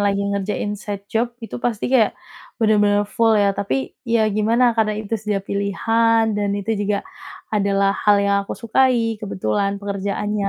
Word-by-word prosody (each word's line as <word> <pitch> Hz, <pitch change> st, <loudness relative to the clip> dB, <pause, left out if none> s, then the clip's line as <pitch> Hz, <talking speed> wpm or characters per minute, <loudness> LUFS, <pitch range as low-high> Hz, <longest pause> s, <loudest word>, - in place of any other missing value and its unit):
lagi 200 Hz, 0 st, +1 dB
ngerjain 200 Hz, +1 st, -2 dB
side 205 Hz, -1 st, -6 dB
job 235 Hz, +2 st, -1 dB
itu 240 Hz, -, -7 dB
pasti 235 Hz, -4 st, -2 dB
kayak 230 Hz, -5 st, +3 dB, 0.4 s
bener-bener 205 Hz, -2 st, +3 dB
full 225 Hz, +1 st, +2 dB
ya, 200 Hz, -1 st, +3 dB
tapi 135 Hz, -11 st, -2 dB, 0.2 s
ya 230 Hz, -1 st, +3 dB
gimana 230 Hz, +4 st, +3 dB
karena 215 Hz, -2 st, 0 dB
itu 215 Hz, 0 st, -7 dB
sudah 205 Hz, -2 st, -2 dB
pilihan 225 Hz, +3 st, +1 dB
dan 205 Hz, -1 st, -1 dB
itu 205 Hz, +2 st, -4 dB
juga 205 Hz, 0 st, -1 dB, 0.5 s
adalah 200 Hz, -1 st, +2 dB
hal 205 Hz, 0 st, +3 dB
yang 200 Hz, 0 st, +2 dB
aku -, -, -4 dB
sukai 230 Hz, -2 st, +1 dB
kebetulan 200 Hz, 0 st, -1 dB
pekerjaannya 200 Hz, +1 st, -2 dB
210 Hz, 155 wpm, -21 LUFS, 200-225 Hz, 0.5 s, kayak